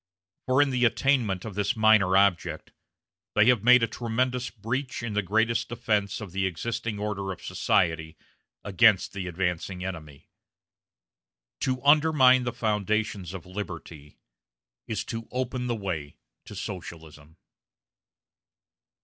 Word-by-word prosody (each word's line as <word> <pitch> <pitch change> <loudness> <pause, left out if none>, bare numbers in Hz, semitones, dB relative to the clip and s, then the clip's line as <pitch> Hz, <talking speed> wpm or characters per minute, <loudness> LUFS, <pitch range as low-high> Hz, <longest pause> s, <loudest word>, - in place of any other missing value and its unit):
For 130 +3 +4
in 140 - -2
the 125 -1 0
attainment 115 -6 +1
of 110 - -6
this 105 +4 -1
minor 110 -4 +4
object, 100 -3 +1 0.6
they 105 - +5
have 120 -5 +3
made 125 0 +6
a - - +2
tremendous 125 +2 -2
breach 125 +4 -4
in 115 -3 -4
the 105 - +1
greatest 110 +4 0
defense 110 -4 -1
of 105 -5 -8
the 95 +1 0
existing 110 +4 -4
order 100 -2 -3
of 90 - -9
society 80 -2 0 0.5
against 100 0 +3
the 95 -2 -5
advancing 90 +1 -3
enemy. 75 -6 -8 1.3
To 130 0 -2
undermine 145 -4 +5
the 120 - -1
foundations 105 -4 -2
of 90 - -8
Liberty 85 -6 -8 0.7
is 110 - -2
to 115 -1 -6
open 125 0 -3
the 120 - -1
way 85 -9 -5 0.3
to - - -10
Socialism. 80 -1 -9
105 Hz, 130 wpm, -26 LUFS, 90-120 Hz, 1.3 s, made